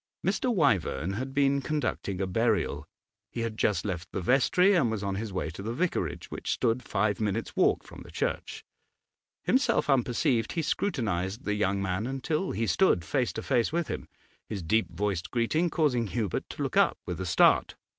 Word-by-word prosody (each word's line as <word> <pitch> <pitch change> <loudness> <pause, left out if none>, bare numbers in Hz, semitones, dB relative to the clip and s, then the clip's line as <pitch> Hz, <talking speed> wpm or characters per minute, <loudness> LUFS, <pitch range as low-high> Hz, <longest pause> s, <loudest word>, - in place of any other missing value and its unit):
Mr. 255 - +1
Wyvern 105 - +1
had 130 +6 -4
been 140 0 +2
conducting 140 -10 -2
a 95 - 0
burial; 100 -7 0 0.4
he 120 - -4
had 115 -1 -2
just 105 -4 +1
left 90 -4 -4
the - - -3
vestry 140 - +4
and 155 - +3
was 110 -2 -3
on 100 -1 -1
his 105 +2 -4
way 90 -4 -3
to 90 - -8
the 115 +4 -4
vicarage, 180 +4 -2
which - - -5
stood 120 0 +1
five 105 -2 0
minutes' 105 -3 -2
walk - - +3
from - - -12
the - - -12
church. - - -3 0.8
Himself 255 - +2
unperceived, 120 -3 +1
he 165 - -1
scrutinised 110 - -1
the 105 - 0
young 100 -1 0
man 95 +4 -1
until 150 +7 -2
he 115 +4 -1
stood 110 - +3
face 130 -4 0
to - - -5
face 120 -4 +1
with 170 0 -1
him; - - -4 0.4
his 100 -5 -4
deep 110 +7 +2
voiced 95 0 -2
greeting 155 +9 +1
caused 150 -5 +1
Hubert 115 -3 -2
to - - -4
look - - -3
up' - - +4
with - - -4
a - - -2
start. 85 - +4
115 Hz, 185 wpm, -28 LUFS, 95-135 Hz, 0.8 s, vestry